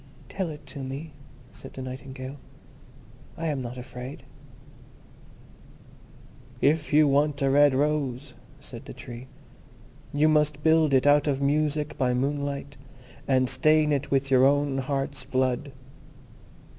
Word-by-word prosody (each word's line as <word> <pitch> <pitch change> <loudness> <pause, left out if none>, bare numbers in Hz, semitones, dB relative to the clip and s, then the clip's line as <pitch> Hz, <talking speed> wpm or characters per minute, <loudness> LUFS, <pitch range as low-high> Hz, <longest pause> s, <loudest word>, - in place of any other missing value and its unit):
"Tell 190 -4 -3
it 150 -1 -9
to 140 0 -9
me," 135 +4 -6 0.4
said - - -11
the 130 - -7
Nightingale, 130 +1 -7 1.0
"I 165 - -4
am 145 -4 -1
not 125 0 -6
afraid." 125 +1 -8 2.4
"If 150 +3 +2
you 150 0 +5
want 145 +1 +2
a 135 - +3
red 145 -1 +5
rose," 140 -2 -1 0.3
said - - -10
the - - -9
Tree, 120 +2 -9 0.8
"you 145 +2 +3
must 150 -1 +2
build 160 -3 +4
it 130 - +3
out 145 +1 +5
of 135 -2 +1
music 150 +1 0
by 125 -2 +2
moonlight, 140 +1 -2 0.5
and 130 -1 +3
stain 150 +4 +3
it 140 -2 -1
with 135 0 0
your 130 -1 +5
own 140 0 +3
heart's 135 0 -2
blood. 130 +1 -1
140 Hz, 130 wpm, -26 LUFS, 130-150 Hz, 2.4 s, you